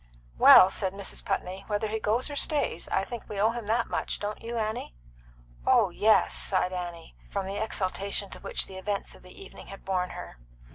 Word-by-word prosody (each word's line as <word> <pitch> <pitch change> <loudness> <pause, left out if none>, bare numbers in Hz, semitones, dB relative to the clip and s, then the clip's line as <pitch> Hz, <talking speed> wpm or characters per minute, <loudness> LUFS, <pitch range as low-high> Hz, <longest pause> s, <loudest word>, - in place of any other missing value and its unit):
"Well," 185 - +9
said 190 -2 -1
Mrs. 200 -1 -4
Putney, 190 +2 -3
"whether 210 +1 -1
he 220 +1 -2
goes 220 +4 +1
or - - -5
stays, 285 - +1
I 190 - +1
think 235 +2 -8
we 205 - -4
owe 220 +3 +4
him 235 -3 -6
that 230 +2 +1
much. - - -3
Don't 210 +1 -4
you, 235 +1 -5
Annie?" 215 - -3 0.7
"Oh - - +4
yes!" - - +3
sighed 65 - 0
Annie, 175 -2 -6
from 195 -1 -3
the 200 +3 -2
exaltation 200 -1 -2
to - - -8
which - - -1
the 190 -1 -9
events 200 +1 -3
of - - -16
the 180 - -14
evening 195 - -12
had 195 - -11
borne 185 -1 -1
her. - - -9
200 Hz, 200 wpm, -28 LUFS, 185-220 Hz, 0.7 s, Well